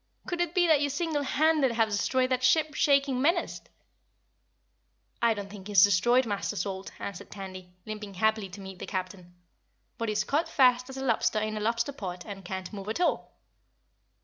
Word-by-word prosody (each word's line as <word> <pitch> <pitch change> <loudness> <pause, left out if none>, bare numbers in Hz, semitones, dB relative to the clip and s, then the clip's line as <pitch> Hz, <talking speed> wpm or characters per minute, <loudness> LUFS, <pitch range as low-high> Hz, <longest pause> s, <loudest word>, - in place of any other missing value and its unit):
Could 350 -1 -2
it 345 -1 -2
be 360 -1 +4
that 315 -4 +4
you 290 - +1
single 305 0 -1
handed 285 -1 +2
have 225 -1 +2
destroyed 255 +5 +1
that 255 0 +1
ship 305 +4 +3
shaking 275 -3 +2
menace?" 335 +5 +1 1.6
"I 230 -1 +3
don't 205 -1 -6
think 200 -1 -10
he's 200 -3 +6
destroyed, 240 +6 +4
Master 205 -1 -2
Salt," 195 -1 -4
answered 200 -3 -7
Tandy, 185 -2 -9
limping 210 -2 -7
happily 220 0 +1
to 190 +2 -10
meet 190 -1 -9
the - - -7
Captain, 185 -2 -5 0.6
"but 230 -1 -1
he's 215 0 0
caught 295 +9 0
fast 250 -1 +3
as 265 - -8
a 265 - -4
lobster 230 -2 +1
in 215 0 -2
a - - -3
lobster 230 +4 0
pot 180 -8 -6
and 195 -2 -8
can't 190 +2 -6
move 200 0 -6
at 220 - -2
all." 360 - 0
220 Hz, 185 wpm, -28 LUFS, 195-270 Hz, 1.6 s, he's